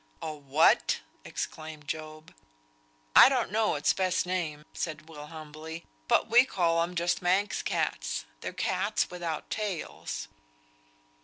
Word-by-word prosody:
"A 155 Hz, -, -4 dB
what?" 145 Hz, +1 st, +3 dB, 0.2 s
exclaimed 155 Hz, -2 st, -6 dB
Job. 155 Hz, +1 st, -6 dB, 0.8 s
"I -, -, +11 dB
don't 255 Hz, -4 st, 0 dB
know 215 Hz, -3 st, +2 dB
its 145 Hz, -, +2 dB
best 185 Hz, -2 st, +1 dB
name," 165 Hz, -5 st, -2 dB
said 155 Hz, -1 st, -4 dB
Will, 150 Hz, -2 st, -9 dB
humbly. 160 Hz, +1 st, -8 dB, 0.2 s
"But -, -, +3 dB
we 240 Hz, +3 st, +7 dB
call 170 Hz, -9 st, +1 dB
'em 175 Hz, +2 st, -2 dB
just 175 Hz, +2 st, +1 dB
Manx 190 Hz, +3 st, +1 dB
cats. -, -, -1 dB
They're -, -, -4 dB
cats -, -, 0 dB
without 170 Hz, -3 st, -4 dB
tails." 180 Hz, -, -4 dB
160 Hz, 130 wpm, -29 LUFS, 155-180 Hz, 0.8 s, I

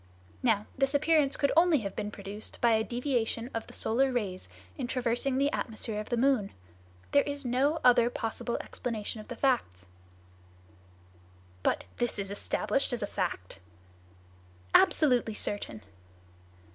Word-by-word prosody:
Now, 215 Hz, -4 st, +2 dB
this 270 Hz, +1 st, +1 dB
appearance 300 Hz, -1 st, +3 dB
could 280 Hz, -, +2 dB
only 330 Hz, -4 st, +5 dB
have 195 Hz, -2 st, -5 dB
been 210 Hz, -, -3 dB
produced 205 Hz, +1 st, -8 dB
by 235 Hz, -, +4 dB
a 220 Hz, 0 st, +3 dB
deviation 240 Hz, -1 st, -1 dB
of 225 Hz, -, -4 dB
the -, -, -12 dB
solar 260 Hz, +4 st, +1 dB
rays 195 Hz, -, -3 dB, 0.3 s
in -, -, -3 dB
traversing 255 Hz, +1 st, 0 dB
the 280 Hz, +1 st, +2 dB
atmosphere 220 Hz, -2 st, -3 dB
of 210 Hz, -, -6 dB
the 240 Hz, -, 0 dB
moon. 245 Hz, -5 st, +2 dB, 0.6 s
There 285 Hz, -, +6 dB
is 285 Hz, -1 st, -5 dB
no 270 Hz, +6 st, +2 dB
other 240 Hz, -1 st, +6 dB
possible 235 Hz, 0 st, -3 dB
explanation 220 Hz, -2 st, -4 dB
of 215 Hz, -, -14 dB
the -, -, -6 dB
facts." 100 Hz, -, 0 dB, 1.8 s
"But -, -, 0 dB
is 240 Hz, -1 st, 0 dB
this 200 Hz, -1 st, -4 dB
established 260 Hz, +6 st, 0 dB
as 235 Hz, -, -2 dB
a -, -, +1 dB
fact?" 170 Hz, -, -4 dB, 1.1 s
"Absolutely 245 Hz, -7 st, +4 dB
certain!" 200 Hz, -, -3 dB
240 Hz, 145 wpm, -30 LUFS, 210-270 Hz, 1.8 s, There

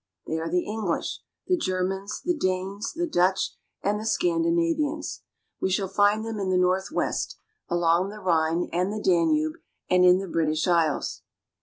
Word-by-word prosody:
They 160 Hz, -, -2 dB
are 165 Hz, +1 st, -3 dB
the 180 Hz, +1 st, +1 dB
English, 210 Hz, -5 st, -2 dB, 0.3 s
the 365 Hz, -, +2 dB
Germans, 190 Hz, -, -2 dB
the 355 Hz, 0 st, +2 dB
Danes, 195 Hz, -3 st, -2 dB
the 345 Hz, +2 st, -1 dB
Dutch, 190 Hz, -, +1 dB, 0.3 s
and 205 Hz, +1 st, +1 dB
the 215 Hz, -, -6 dB
Scandinavians; 330 Hz, 0 st, 0 dB, 0.4 s
we -, -, 0 dB
shall 190 Hz, +1 st, 0 dB
find 205 Hz, +3 st, +2 dB
them 225 Hz, -2 st, -4 dB
in 195 Hz, -1 st, -1 dB
the 185 Hz, -, +2 dB
northwest, 185 Hz, -, 0 dB, 0.3 s
along 175 Hz, +1 st, +2 dB
the 210 Hz, -, -9 dB
Rhine 170 Hz, -2 st, +1 dB
and 180 Hz, +3 st, +1 dB
the 215 Hz, -, -3 dB
Danube, 160 Hz, -5 st, +2 dB, 0.3 s
and 180 Hz, 0 st, +5 dB
in 180 Hz, 0 st, +7 dB
the 195 Hz, 0 st, -4 dB
British 160 Hz, -1 st, 0 dB
Isles. 165 Hz, -4 st, +1 dB
190 Hz, 160 wpm, -26 LUFS, 175-215 Hz, 0.4 s, in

